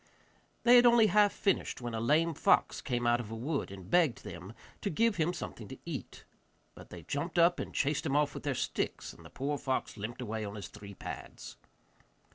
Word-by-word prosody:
They 245 +1 +8
had 245 0 +7
only 235 -2 +6
half 210 -1 +4
finished, 195 - 0
when 120 -2 -5
a 115 - -2
lame 155 +8 +2
fox - - +2
came 120 -2 -2
out 120 0 +3
of 115 -3 -6
a 115 - -5
wood 140 +6 -2
and 95 -2 -10
begged 160 - +2
them 90 +4 -8 0.3
to 200 - -1
give 225 +5 +2
him 165 +1 +2
something 180 - -7
to - - -9
eat. - - -6 0.5
But - - -13
they 90 -2 -10
jumped 145 - -3
up 170 +1 +5
and - - -4
chased 145 +2 0
him 140 - 0
off 145 -1 +2
with - - -6
their 145 -2 -1
sticks, - - -3
and - - -16
the - - -12
poor 145 +1 -3
fox 130 -3 -2
limped 110 +4 -6
away 110 -1 -3
on 100 0 -6
his 100 - -7
three 100 -1 -11
pads. 60 -7 -8
140 Hz, 215 wpm, -31 LUFS, 110-170 Hz, 0.5 s, They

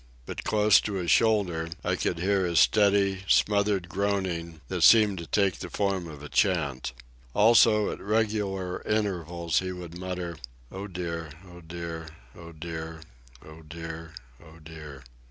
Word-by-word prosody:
But, - - -6
close 105 -1 +4
to 105 - -4
his 90 -3 -1
shoulder, 95 -8 +2
I - - 0
could 85 - -1
hear 95 +2 +1
his 85 -2 +2
steady, 100 -2 +3
smothered 100 -3 +2
groaning 90 -4 -2
that - - -3
seemed 105 -5 +6
to 85 - -7
take 100 -3 +1
the - - -6
form 95 -4 -1
of 75 -2 -10
a - - -6
chant. 75 - 0 0.4
Also, 110 -1 +5
at - - -7
regular 100 -3 -1
intervals, 85 -6 -1
he 95 0 -4
would 90 -2 -8
mutter: 90 -2 -5 0.3
"Oh 95 +2 -6
dear, 85 -3 -5 0.2
oh 90 0 -13
dear, 80 -1 -7 0.3
oh 85 0 -11
dear, 80 0 -7 0.4
oh 80 +1 -12
dear, 80 +1 -8 0.3
oh 80 0 -15
dear." 75 -4 -11
90 Hz, 150 wpm, -27 LUFS, 80-100 Hz, 0.4 s, seemed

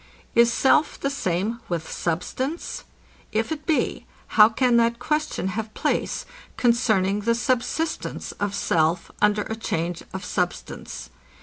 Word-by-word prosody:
Is 235 0 +5
self 270 +5 +3
the 275 - -1
same 205 -1 -1
with 165 -2 -2
substance? 255 - -3 0.5
If 220 +4 0
it 305 -1 -4
be, 315 - 0 0.2
how 210 0 +7
can 240 +1 +3
that 235 0 +3
question 300 -5 -1
have 215 +2 -4
place, - - -1 0.3
concerning 215 -5 +3
the 230 +3 +1
subsistence 255 +6 -1
of 205 -1 -1
self, 165 -2 +1
under 210 0 +3
a 220 - -4
change 170 -5 -2
of 190 +1 -6
substance? 175 - -3
220 Hz, 130 wpm, -24 LUFS, 185-245 Hz, 0.5 s, how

